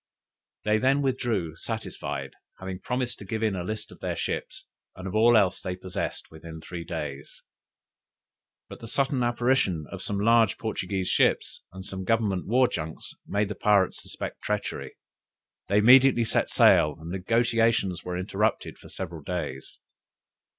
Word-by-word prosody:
They 105 Hz, 0 st, +3 dB
then 135 Hz, +4 st, +2 dB
withdrew 115 Hz, -, -1 dB
satisfied, -, -, -5 dB, 0.3 s
having 95 Hz, -1 st, -6 dB
promised 125 Hz, +2 st, -3 dB
to -, -, -8 dB
give 110 Hz, +2 st, -3 dB
in 110 Hz, -3 st, +1 dB
a 90 Hz, -, -3 dB
list 110 Hz, +4 st, -5 dB
of -, -, -14 dB
their -, -, -3 dB
ships, -, -, -4 dB, 0.3 s
and 95 Hz, +1 st, -7 dB
of 95 Hz, -, -5 dB
all 115 Hz, +2 st, +6 dB
else 100 Hz, -3 st, +2 dB
they 90 Hz, -1 st, -3 dB
possessed, 95 Hz, 0 st, -5 dB
within 80 Hz, 0 st, -10 dB
three 85 Hz, +2 st, -7 dB
days. 75 Hz, -5 st, -6 dB, 1.2 s
But -, -, -10 dB
the 115 Hz, -, -8 dB
sudden 135 Hz, +2 st, 0 dB
apparition 120 Hz, -, +1 dB
of -, -, -6 dB
some 100 Hz, -1 st, -2 dB
large 115 Hz, +2 st, +4 dB
Portuguese 95 Hz, -4 st, -2 dB
ships, -, -, +1 dB
and 95 Hz, 0 st, -9 dB
some 95 Hz, -1 st, -6 dB
Government 105 Hz, -3 st, 0 dB
war 125 Hz, +4 st, +4 dB
junks, 80 Hz, -6 st, -6 dB
made 100 Hz, +1 st, 0 dB
the -, -, -2 dB
pirates 100 Hz, -3 st, +2 dB
suspect -, -, -7 dB
treachery. 105 Hz, -1 st, -3 dB, 0.7 s
They 100 Hz, -, +2 dB
immediately 125 Hz, +2 st, +7 dB
set -, -, 0 dB
sail, 75 Hz, -1 st, +5 dB
and 80 Hz, +2 st, -8 dB
the 95 Hz, -, -2 dB
negociations 115 Hz, -3 st, +1 dB
were 90 Hz, -1 st, -4 dB
interrupted 105 Hz, +4 st, -1 dB
for -, -, -14 dB
several 85 Hz, -4 st, -6 dB
days. 80 Hz, -5 st, -5 dB
100 Hz, 155 wpm, -27 LUFS, 90-115 Hz, 1.2 s, immediately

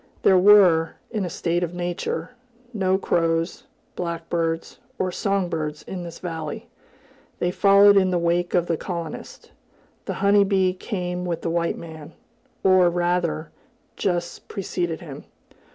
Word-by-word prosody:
There 190 Hz, -1 st, +6 dB
were, 180 Hz, -5 st, +6 dB, 0.2 s
in 215 Hz, -4 st, -1 dB
a -, -, -3 dB
state 170 Hz, +1 st, -1 dB
of 175 Hz, 0 st, -4 dB
nature, 175 Hz, 0 st, -3 dB, 0.4 s
no 190 Hz, -3 st, +1 dB
crows, 165 Hz, -2 st, 0 dB, 0.3 s
blackbirds, 165 Hz, -1 st, -3 dB, 0.2 s
or 185 Hz, -1 st, -1 dB
song 195 Hz, 0 st, 0 dB
birds 155 Hz, -3 st, -4 dB
in 185 Hz, -2 st, -6 dB
this 170 Hz, -1 st, -8 dB
valley; 160 Hz, -4 st, -6 dB, 0.7 s
they 175 Hz, -, 0 dB
followed 200 Hz, +1 st, +6 dB
in 190 Hz, -1 st, +4 dB
the 180 Hz, -, +1 dB
wake 175 Hz, +1 st, 0 dB
of 175 Hz, -1 st, +3 dB
the 165 Hz, -2 st, -1 dB
colonist. 170 Hz, -3 st, -7 dB, 0.5 s
The -, -, -3 dB
honey 200 Hz, 0 st, +6 dB
bee 190 Hz, -2 st, +2 dB
came 180 Hz, -2 st, -4 dB
with 175 Hz, -2 st, -3 dB
the 165 Hz, -, -1 dB
white 170 Hz, 0 st, 0 dB
man, 160 Hz, -1 st, -10 dB, 0.5 s
or 185 Hz, -2 st, +5 dB
rather, 175 Hz, -2 st, -1 dB, 0.4 s
just 175 Hz, -2 st, -2 dB
preceded 175 Hz, -4 st, -3 dB
him. 150 Hz, -6 st, -9 dB
175 Hz, 140 wpm, -23 LUFS, 165-185 Hz, 0.7 s, There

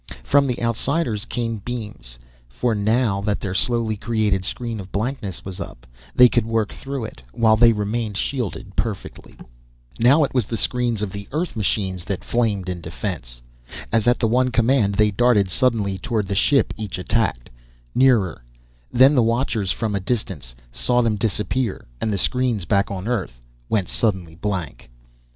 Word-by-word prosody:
From 140 Hz, 0 st, +3 dB
the 125 Hz, -2 st, -2 dB
outsiders 115 Hz, -1 st, 0 dB
came 115 Hz, -2 st, -2 dB
beams, 105 Hz, -, -6 dB, 0.3 s
for 115 Hz, -, 0 dB
now 105 Hz, 0 st, +1 dB
that 100 Hz, 0 st, -1 dB
their 95 Hz, -3 st, -3 dB
slowly 115 Hz, +2 st, +2 dB
created 105 Hz, -3 st, 0 dB
screen 115 Hz, +2 st, -3 dB
of 95 Hz, -1 st, -9 dB
blankness 105 Hz, -3 st, -3 dB
was 95 Hz, -1 st, -6 dB
up, -, -, -9 dB, 0.3 s
they 125 Hz, -, +9 dB
could 120 Hz, -1 st, +1 dB
work 115 Hz, -2 st, 0 dB
through 135 Hz, -3 st, -5 dB
it, 85 Hz, -, -10 dB
while 110 Hz, -, +4 dB
they 115 Hz, +1 st, +6 dB
remained 105 Hz, 0 st, -2 dB
shielded 105 Hz, -7 st, -3 dB
perfectly. 110 Hz, -5 st, -4 dB, 0.6 s
Now 135 Hz, +7 st, +5 dB
it 140 Hz, -, -1 dB
was 125 Hz, -6 st, +1 dB
the 115 Hz, -, -3 dB
screens 120 Hz, -1 st, 0 dB
of 100 Hz, -, -3 dB
the 100 Hz, 0 st, -7 dB
Earth 160 Hz, +3 st, -2 dB
machines 95 Hz, -4 st, -1 dB
that 100 Hz, -3 st, -3 dB
flamed 105 Hz, -6 st, 0 dB
in 90 Hz, -1 st, -4 dB
defense. 80 Hz, -, -6 dB, 0.5 s
As 115 Hz, 0 st, +2 dB
at 120 Hz, -, +4 dB
the 115 Hz, -, +1 dB
one 125 Hz, +3 st, +2 dB
command, 115 Hz, -4 st, +2 dB
they 105 Hz, +1 st, +3 dB
darted 105 Hz, -3 st, +3 dB
suddenly 105 Hz, -5 st, +1 dB
toward 110 Hz, +1 st, -1 dB
the 100 Hz, -, -3 dB
ship 135 Hz, +8 st, +3 dB
each 105 Hz, -4 st, -5 dB
attacked 90 Hz, -, -1 dB, 0.4 s
nearer 115 Hz, -, +3 dB, 0.5 s
then 130 Hz, +4 st, +6 dB
the 130 Hz, -, +4 dB
watchers 115 Hz, -4 st, 0 dB
from 110 Hz, -3 st, -2 dB
a 100 Hz, -, 0 dB
distance 95 Hz, -, -4 dB, 0.2 s
saw 120 Hz, -, +1 dB
them 115 Hz, -2 st, +1 dB
disappear, 105 Hz, +2 st, -1 dB, 0.2 s
and 110 Hz, -, 0 dB
the 100 Hz, -, 0 dB
screens 120 Hz, -2 st, 0 dB
back 100 Hz, +2 st, +2 dB
on 95 Hz, +1 st, -5 dB
Earth 95 Hz, -, -2 dB, 0.3 s
went 100 Hz, -5 st, +1 dB
suddenly 95 Hz, -8 st, -1 dB
blank. 90 Hz, -8 st, -4 dB
110 Hz, 170 wpm, -22 LUFS, 95-120 Hz, 0.6 s, they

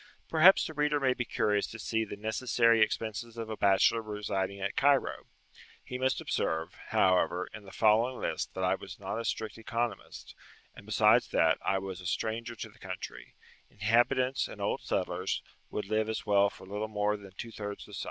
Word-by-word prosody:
Perhaps 170 Hz, +4 st, +6 dB
the 160 Hz, -, -5 dB
reader 150 Hz, 0 st, +1 dB
may 130 Hz, -2 st, +2 dB
be 120 Hz, -, -3 dB
curious 105 Hz, -2 st, +1 dB
to 115 Hz, -, -9 dB
see 110 Hz, +1 st, -1 dB
the 105 Hz, -, -6 dB
necessary 115 Hz, +2 st, +2 dB
expenses 110 Hz, +1 st, -1 dB
of 115 Hz, -1 st, -5 dB
a -, -, -2 dB
bachelor 100 Hz, +3 st, +4 dB
residing 100 Hz, -2 st, -3 dB
at 100 Hz, 0 st, -3 dB
Cairo. 140 Hz, -1 st, +2 dB, 0.6 s
He 125 Hz, -, -6 dB
must 130 Hz, 0 st, +1 dB
observe, 80 Hz, 0 st, -1 dB
however, 90 Hz, -1 st, +2 dB
in 110 Hz, -2 st, -9 dB
the 95 Hz, -, -11 dB
following 115 Hz, +4 st, +3 dB
list -, -, -3 dB
that -, -, -2 dB
I -, -, +3 dB
was -, -, -7 dB
not -, -, -4 dB
a 115 Hz, -, -4 dB
strict 110 Hz, 0 st, -3 dB
economist, 115 Hz, -1 st, -4 dB, 0.4 s
and, -, -, -14 dB
besides -, -, +4 dB
that, -, -, +3 dB
I 95 Hz, -, +1 dB
was 95 Hz, -1 st, -5 dB
a 90 Hz, -, -5 dB
stranger 115 Hz, +5 st, -2 dB
in 110 Hz, -2 st, -11 dB
the 120 Hz, -, -22 dB
country: 95 Hz, -1 st, -8 dB, 0.3 s
inhabitants 120 Hz, +5 st, +2 dB
and -, -, -10 dB
old -, -, -1 dB
settlers 90 Hz, +1 st, -2 dB, 0.3 s
would 105 Hz, -, -3 dB
live 110 Hz, +1 st, 0 dB
as 110 Hz, -, -3 dB
well 100 Hz, -1 st, +4 dB
for 95 Hz, -, -14 dB
little 105 Hz, +3 st, -3 dB
more 105 Hz, -1 st, 0 dB
than 100 Hz, -2 st, -11 dB
two 115 Hz, -, -6 dB
thirds 105 Hz, -2 st, -6 dB
the -, -, -14 dB
sum. -, -, -5 dB
110 Hz, 190 wpm, -30 LUFS, 100-115 Hz, 0.6 s, Perhaps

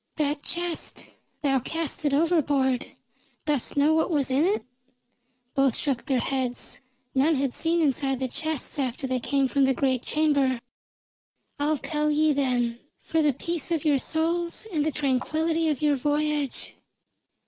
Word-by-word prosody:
"That 295 Hz, -1 st, 0 dB
chest, 345 Hz, 0 st, -3 dB, 0.3 s
thou 270 Hz, -2 st, +3 dB
cast 320 Hz, +3 st, -3 dB
it 290 Hz, -, +3 dB
overboard. 285 Hz, -5 st, +2 dB, 0.6 s
Dost 290 Hz, -2 st, 0 dB
know 295 Hz, +2 st, +4 dB
what 320 Hz, +2 st, +2 dB
was 285 Hz, -5 st, +1 dB
in 270 Hz, +4 st, +3 dB
it?" 410 Hz, +4 st, 0 dB, 0.9 s
Both 270 Hz, -3 st, +3 dB
shook 275 Hz, -3 st, -2 dB
their 265 Hz, -3 st, +2 dB
heads. 255 Hz, 0 st, -2 dB, 0.3 s
None 290 Hz, +4 st, +3 dB
had 270 Hz, -2 st, 0 dB
seen 335 Hz, +1 st, +1 dB
inside 270 Hz, -2 st, +1 dB
the 260 Hz, -, -1 dB
chests 315 Hz, +2 st, -3 dB
after 260 Hz, 0 st, -2 dB
they 255 Hz, -1 st, 0 dB
came 275 Hz, +2 st, +1 dB
from 275 Hz, +1 st, +2 dB
the 265 Hz, -1 st, +2 dB
great 260 Hz, -2 st, +1 dB
chamber. 285 Hz, -5 st, +2 dB, 1.0 s
"I'll 300 Hz, +1 st, +2 dB
tell 300 Hz, +2 st, -1 dB
ye, 305 Hz, 0 st, +3 dB
then, 245 Hz, -4 st, 0 dB, 0.2 s
for 325 Hz, -, 0 dB
the 300 Hz, -1 st, +4 dB
peace 335 Hz, +4 st, -2 dB
of 330 Hz, -3 st, -1 dB
your 290 Hz, -3 st, +4 dB
souls 335 Hz, +6 st, -1 dB
and 300 Hz, -2 st, +2 dB
the 310 Hz, -, 0 dB
tranquillity 315 Hz, +4 st, 0 dB
of 300 Hz, 0 st, -2 dB
your 295 Hz, -2 st, +3 dB
voyage. 295 Hz, 0 st, -1 dB
290 Hz, 155 wpm, -26 LUFS, 265-315 Hz, 1.0 s, know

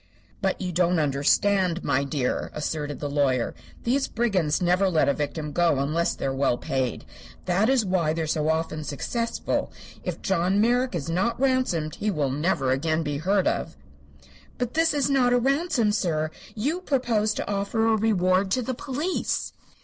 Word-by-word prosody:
"But 190 Hz, -2 st, 0 dB
you 180 Hz, -2 st, -3 dB
don't 175 Hz, +1 st, +2 dB
understand, 170 Hz, +5 st, +2 dB
my 140 Hz, 0 st, +1 dB
dear," 140 Hz, -2 st, -2 dB
asserted 150 Hz, -1 st, -3 dB
the 145 Hz, -, -3 dB
lawyer. 140 Hz, -4 st, +1 dB, 0.3 s
"These 270 Hz, +3 st, +1 dB
brigands 190 Hz, -10 st, 0 dB
never 180 Hz, +2 st, +2 dB
let 160 Hz, -4 st, +2 dB
a 140 Hz, -, +3 dB
victim 150 Hz, +1 st, -3 dB
go 170 Hz, 0 st, +2 dB
free 135 Hz, -, 0 dB
unless 165 Hz, +4 st, 0 dB
they -, -, -5 dB
are 135 Hz, -, 0 dB
well 135 Hz, -2 st, +1 dB
paid. 130 Hz, -3 st, -2 dB, 0.4 s
That 190 Hz, +6 st, +2 dB
is 260 Hz, -5 st, +3 dB
why 180 Hz, -5 st, +1 dB
they 165 Hz, +1 st, -1 dB
are -, -, -1 dB
so 155 Hz, 0 st, 0 dB
often 160 Hz, -1 st, -1 dB
successful. 230 Hz, -, -2 dB, 0.3 s
If -, -, -5 dB
John 190 Hz, +1 st, +1 dB
Merrick 245 Hz, +1 st, +2 dB
is 160 Hz, -4 st, -3 dB
not 190 Hz, +9 st, 0 dB
ransomed 255 Hz, -, 0 dB
he 215 Hz, -, -1 dB
will 150 Hz, -8 st, 0 dB
never 140 Hz, -2 st, 0 dB
again 155 Hz, +4 st, 0 dB
be 145 Hz, -2 st, -2 dB
heard 190 Hz, +4 st, +1 dB
of." -, -, -1 dB, 0.8 s
"But 245 Hz, -1 st, -2 dB
this 325 Hz, +1 st, +3 dB
is 285 Hz, -, +2 dB
not 260 Hz, -3 st, +3 dB
a -, -, +5 dB
ransom, 270 Hz, -3 st, +1 dB
sir. 155 Hz, -6 st, 0 dB, 0.2 s
You 290 Hz, +12 st, -1 dB
propose 240 Hz, -, +1 dB
to -, -, -3 dB
offer 205 Hz, +3 st, 0 dB
a 225 Hz, -1 st, +4 dB
reward 190 Hz, -3 st, +2 dB
to 255 Hz, -, +1 dB
the 255 Hz, -, -2 dB
police." 290 Hz, +8 st, -2 dB
180 Hz, 180 wpm, -25 LUFS, 150-230 Hz, 0.8 s, a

